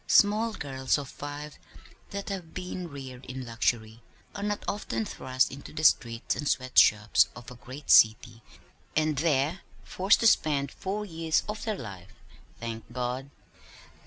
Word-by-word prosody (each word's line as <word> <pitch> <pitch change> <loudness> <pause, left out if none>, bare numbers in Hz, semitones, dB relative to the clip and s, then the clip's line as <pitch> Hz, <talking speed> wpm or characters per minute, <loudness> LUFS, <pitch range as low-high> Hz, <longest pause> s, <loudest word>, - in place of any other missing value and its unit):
Small 215 +2 +4
girls 135 -6 -1
of 140 -2 -6
five 145 +1 -7 0.5
that 200 +1 -5
have 185 -5 -6
been 180 -1 -5
reared 135 -3 -9
in 130 0 -6
luxury 115 -1 -1 0.3
are 200 - -6
not 205 0 -2
often 115 - -2
thrust 130 +3 0
into 140 +1 -9
the 155 - -5
streets 115 -6 +3
and 150 - -4
sweat 130 -2 +3
shops 105 -3 +5
of 120 0 -10
a - - -9
great 130 +4 -6
city 110 +1 +5 0.5
and 155 -2 +1
there 155 +2 +1 0.2
forced 190 +3 +2
to - - +1
spend 145 - +3
four 205 +2 -4
years 165 -3 0
of 210 0 -4
their 215 -3 -1
life 95 - -9 0.4
thank 115 0 -6
God! 125 +2 -3
140 Hz, 155 wpm, -28 LUFS, 120-180 Hz, 0.5 s, shops